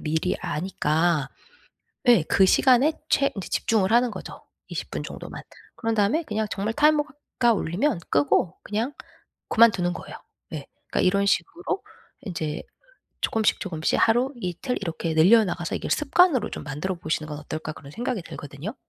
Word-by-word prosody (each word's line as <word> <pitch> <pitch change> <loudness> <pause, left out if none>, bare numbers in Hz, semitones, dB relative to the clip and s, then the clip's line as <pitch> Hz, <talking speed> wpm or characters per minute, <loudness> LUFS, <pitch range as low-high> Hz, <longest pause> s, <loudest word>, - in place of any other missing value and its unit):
미리 160 +3 0
아니까. 160 -2 0 0.8
예 235 -9 +6
그 190 - +5
시간에 260 +8 +5 0.2
최 275 - +3
인제 195 - -5
집중을 215 -3 +1
하는 240 0 +4
거죠 - - -9 0.3
20 - - -5
분 - - -3
정도만. - - -8 0.4
그런 225 -1 -1
다음에 220 +11 +2
그냥 220 -5 -2
정말 210 +3 -2
타이머가 300 +2 +3 0.3
가 240 -2 +5
울리면 200 - 0
끄고 145 +5 +2
그냥 225 +6 -2 0.6
그만두는 210 -6 +4
거예요. - - -8 0.4
예. 145 -3 -6 0.2
그러니까 - - 0
이런 200 +2 +3
식으로 350 - -1 0.4
인제 160 -7 -4 0.6
조금씩 220 -1 +2
조금씩 160 -5 -1
하루, 240 +4 +3
이틀 185 +5 -3
이렇게 165 -3 -3
늘려나가서 180 0 +4
'이걸 - - -5
습관으로 300 - +3
좀 - - -6
만들어 150 +6 -3
보시는 155 -2 -2
건 150 -1 -5
어떨까.' 155 +1 -5
그런 140 -2 -12
생각이 240 - -2
들거든요. 145 - -7
200 Hz, 345 characters per minute, -25 LUFS, 160-240 Hz, 0.8 s, 예